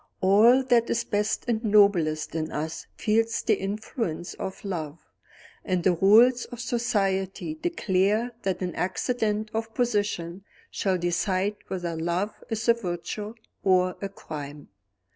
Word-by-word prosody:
All 215 +7 +5
that 240 -2 +3
is 235 - +1
best 210 -2 -1
and 230 -1 0
noblest 200 -8 +3
in 160 -1 -3
us 160 +2 -4
feels 225 +1 +1
the - - +3
influence 195 -3 -3
of 190 - -7
love 160 -5 -4 0.7
and 185 -3 -1
the 185 - +4
rules 230 +8 +5
of 245 - -10
society 205 - -1
declare 230 - 0
that 190 -1 -2
an 180 - -3
accident 215 +3 -1
of 225 0 -3
position 205 -6 -1 0.3
shall 190 -2 0
decide 185 +3 0
whether 175 -3 -3
love 175 +6 -1 0.2
is 225 0 -3
a 235 - +7
virtue 210 +1 -5 0.3
or 185 -1 +3
a 200 - -3
crime. 150 -6 -8
200 Hz, 135 wpm, -26 LUFS, 175-225 Hz, 0.7 s, a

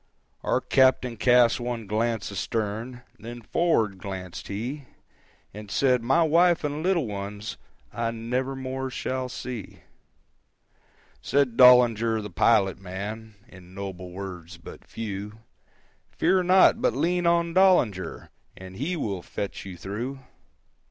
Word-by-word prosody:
Our - - 0
captain 130 -2 +3
cast 120 +1 +4
one 120 -2 -4
glance 110 0 -1
astern, 110 +5 -3 0.2
Then 120 +1 -9
forward 110 - +1
glancèd 95 -3 -7
he, 125 +8 -5 0.7
And 105 0 -9
said, 125 +2 +2
"My 135 +8 +3
wife 170 +2 +3
and 150 +1 -2
little 175 -4 +1
ones 100 0 -6 0.4
I 115 -1 -1
never 125 +4 -3
more 130 0 -4
shall 130 0 -3
see." 125 -4 -7 1.4
Said 140 -4 +1
Dollinger 115 -3 +6
the 105 -2 -7
pilot 95 +2 +3
man, 100 +4 -7
In 90 0 -15
noble 95 -2 -6
words, 90 -2 -8
but 85 - -13
few,—"Fear 110 - -4
not, 190 +5 +5
but 255 - +1
lean 175 0 +1
on 170 0 +2
Dollinger, 125 - +2 0.3
And 95 0 -10
he 160 +8 -2
will 100 - -3
fetch 100 +2 -6
you 90 -2 -8
through." 110 +9 -4
370. 135 -1 -18
115 Hz, 125 wpm, -26 LUFS, 100-135 Hz, 1.4 s, Dollinger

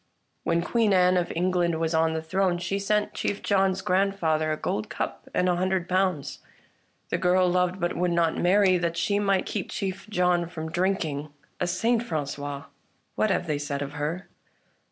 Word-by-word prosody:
When 170 0 +1
Queen 225 0 +2
Anne 180 0 +4
of 175 -1 0
England 175 -1 +1
was 165 0 0
on 160 0 +2
the 160 - -3
throne 185 +1 +1
she 180 +3 -2
sent 210 +1 0
Chief 205 - -3
John's 190 -1 +1
grandfather 180 -5 +1
a 155 - -1
gold 105 -6 -3
cup - - -5
and 180 - +1
a 175 -1 +2
hundred 185 -1 0
pounds. 185 -6 0 0.7
The 170 - -1
girl 180 +1 +3
loved, 180 +1 +1
but 175 0 -1
would 180 +1 +1
not 170 -2 +2
marry, 185 0 +4
that 170 -1 -1
she 200 +5 +1
might 195 -2 +1
keep 200 -4 -4
Chief 195 +1 -4
John 180 -3 +1
from 160 -1 -6
drinking. 165 -5 -1 0.3
A 180 - 0
saint, 225 +6 +1
Frangois! 145 - -4 0.5
What 215 - +1
have 185 - 0
they 150 -3 -1
said 145 -1 -3
of 140 0 -7
her 155 +6 -3
180 Hz, 180 wpm, -26 LUFS, 160-190 Hz, 0.7 s, Anne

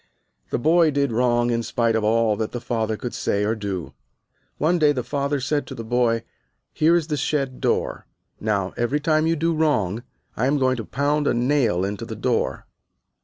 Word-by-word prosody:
The - - 0
boy 160 +5 +4
did 140 -2 0
wrong 120 0 +2
in 115 0 0
spite 115 -1 0
of 110 - 0
all 110 0 +2
that 110 -1 -3
the 120 - -3
father 110 -3 -2
could 125 - -5
say 100 0 0
or 105 +2 +1
do. 95 - -4 0.6
One 170 +4 +2
day 150 -2 +4
the 125 -3 -2
father 140 +2 -1
said 145 +3 -1
to 135 - -7
the 115 - -6
boy, 115 -1 +1 0.5
"Here 165 +2 +4
is 170 -3 +1
the 150 -1 -2
shed 135 -1 -1
door, - - -1 0.3
now 100 -3 -1
every 120 +5 0
time 155 +1 +2
you 165 - +2
do 165 +2 0
wrong 120 - +1 0.3
I 125 - +1
am 145 +2 +2
going 130 -2 +2
to 115 - -5
pound 145 +5 0
a - - +2
nail 120 -7 +2
into 100 0 -4
the - - -5
door." - - -1
125 Hz, 200 wpm, -23 LUFS, 110-145 Hz, 0.6 s, boy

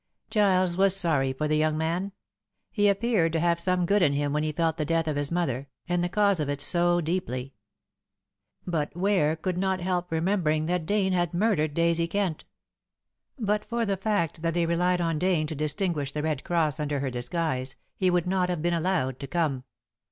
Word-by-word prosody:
Giles 185 -4 +2
was 195 0 +4
sorry 155 -8 +1
for 150 +4 -2
the 155 0 +1
young 155 0 +1
man. 170 +5 -1 0.6
He 205 - +2
appeared 200 -5 +1
to 165 - +1
have 170 0 +2
some 180 0 +1
good 200 +3 +2
in 145 -5 +4
him 145 0 -1
when 150 - +1
he 155 0 -1
felt 160 +1 0
the 155 - 0
death 165 +1 0
of 155 - -1
his 145 +1 -2
mother, 140 -6 -1 0.2
and 175 -1 0
the 175 - 0
cause 200 -2 +2
of 150 -2 -1
it, 145 0 -2
so 175 +3 +2
deeply. 140 -6 -3 1.1
But 160 -5 -2
Ware 180 -5 +2
could 180 +2 -3
not 190 0 0
help 180 -1 -2
remembering 160 -2 +1
that 175 -1 -1
Dane 200 -2 +1
had 175 -2 0
murdered 175 -7 +1
Daisy 170 0 +2
Kent. 190 -4 -2 0.9
But 210 -3 0
for 235 +1 -2
the 200 -2 0
fact 190 -6 -1
that 165 0 -1
they 170 -1 +2
relied 175 +2 +1
on 165 -2 0
Dane 180 -3 +1
to 155 - -5
distinguish 150 0 -1
The 150 +1 -3
Red 155 -4 -1
Cross 160 -4 0
under 145 -1 -1
her 135 -2 -2
disguise, 130 +1 -2 0.2
he 185 - +1
would 175 -2 +1
not 180 0 +1
have 175 -3 -2
been 175 0 +1
allowed 165 -7 0
to 140 - -6
come. 140 -5 -1
170 Hz, 200 wpm, -27 LUFS, 150-185 Hz, 1.1 s, was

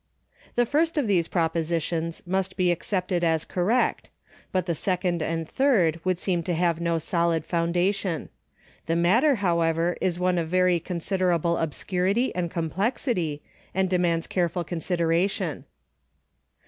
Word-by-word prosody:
The 240 - +3
first 320 +6 +1
of 290 - +2
these 180 -6 +2
propositions 165 -1 -1
must 190 +1 -1
be 180 -1 +3
accepted 180 0 -1
as 160 -2 +1
correct, 205 +8 0 0.4
but 185 -2 0
the 170 - 0
second 180 0 -1
and 165 0 -2
third 180 - +2
would 185 -1 +1
seem 175 -1 -1
to 170 +1 -2
have 170 -1 +1
no 170 -1 +1
solid 170 -1 0
foundation. 175 +1 0 0.6
The 165 - +1
matter, 225 - +4
however, 170 0 +1
is 175 -2 0
one 180 0 +1
of 165 - -2
very 180 -1 +3
considerable 175 -1 0
obscurity 185 - 0
and 175 -1 -2
complexity, 175 - -1 0.3
and 190 -1 +1
de 180 - +2
mands 170 -2 +1
careful 175 -1 -1
consideration. 170 +2 -1
175 Hz, 135 wpm, -25 LUFS, 165-185 Hz, 0.6 s, matter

